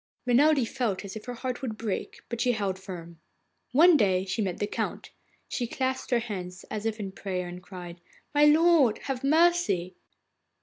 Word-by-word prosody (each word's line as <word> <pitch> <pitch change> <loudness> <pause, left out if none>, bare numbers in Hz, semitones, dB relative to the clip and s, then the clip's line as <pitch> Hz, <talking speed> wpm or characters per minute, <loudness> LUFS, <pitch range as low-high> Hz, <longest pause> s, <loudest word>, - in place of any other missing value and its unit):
Renelde 270 +1 +4
felt 225 -7 -2
as 195 - -7
if 215 - -8
her 245 -1 -5
heart 255 +1 -4
would 225 -5 -4
break, 215 -4 -4
but 235 -1 -4
she 245 -1 +3
held 195 -4 -2
firm. 170 -3 -9 0.5
One 330 +5 +7
day 190 -4 +2
she 195 +3 -2
met 185 -4 -2
the - - -1
Count. 205 - -4 0.4
She 240 - -2
clasped 260 +1 -2
her 245 - +3
hands 190 -5 -5
as 215 +1 -2
if 220 0 -3
in 195 -2 -4
prayer, 185 -2 -4
and 175 +1 -8
cried: 175 -2 -10 0.3
'My 295 0 +5
lord, 300 -6 +5
have 270 -2 -3
mercy! 315 - +3
220 Hz, 180 wpm, -28 LUFS, 190-265 Hz, 0.5 s, One